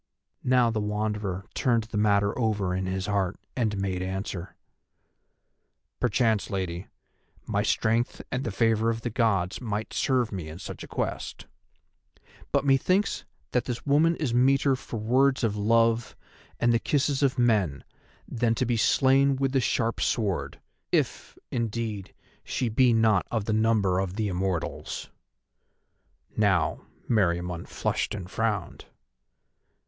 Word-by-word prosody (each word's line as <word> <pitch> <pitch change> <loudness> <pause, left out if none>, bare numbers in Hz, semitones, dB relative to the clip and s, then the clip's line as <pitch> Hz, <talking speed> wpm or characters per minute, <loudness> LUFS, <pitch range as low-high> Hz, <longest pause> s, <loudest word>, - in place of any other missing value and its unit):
Now 125 -2 +3
the 110 - -1
Wanderer 105 -2 -2
turned 120 -4 +2
the 110 0 -6
matter 100 -1 +2
over 105 -6 0
in 95 0 -2
his 95 0 -2
heart 100 -2 -1 0.2
and 110 -5 0
made 95 -2 -2
answer: 95 -1 -4 1.4
"Perchance, 115 -3 +1
Lady, 95 -2 -3 0.6
my - - 0
strength 115 +2 +1
and 130 +1 -1
the - - -2
favour 115 +2 +2
of 115 0 -2
the 120 - -3
Gods 100 -5 +1
might 110 -2 -3
serve 125 -4 +1
me 90 -6 -5
in 80 - -8
such - - -8
a - - -9
quest. - - -4 1.1
But - - +1
methinks 180 +9 +2 0.3
that 125 - +1
this 120 -2 -4
woman 155 +4 +4
is 140 -8 -2
meeter 135 +2 +4
for 125 - -7
words 130 +5 +2
of 110 -3 +1
love 115 +2 +2 0.4
and 120 0 +3
the 115 - +3
kisses 140 +1 0
of 135 -1 +2
men 105 - +2 0.4
than 115 -1 0
to 130 - 0
be 120 -1 0
slain 135 +4 +4
with 135 0 0
the 135 -1 +2
sharp 115 0 0
sword, 105 -6 -1 0.3
if, - - -1
indeed, 115 -4 -3 0.3
she 125 -3 -2
be 125 +3 +4
not 110 -4 +3
of 110 -4 -1
the 110 - 0
number 110 -4 +2
of 95 -1 -2
the 110 -1 -1
immortals." 90 -2 -3 1.2
Now 95 -6 +1 0.2
Meriamun 90 -5 0
flushed - - -2
and 95 -4 -6
frowned. 110 -2 -2
110 Hz, 140 wpm, -27 LUFS, 100-120 Hz, 1.4 s, woman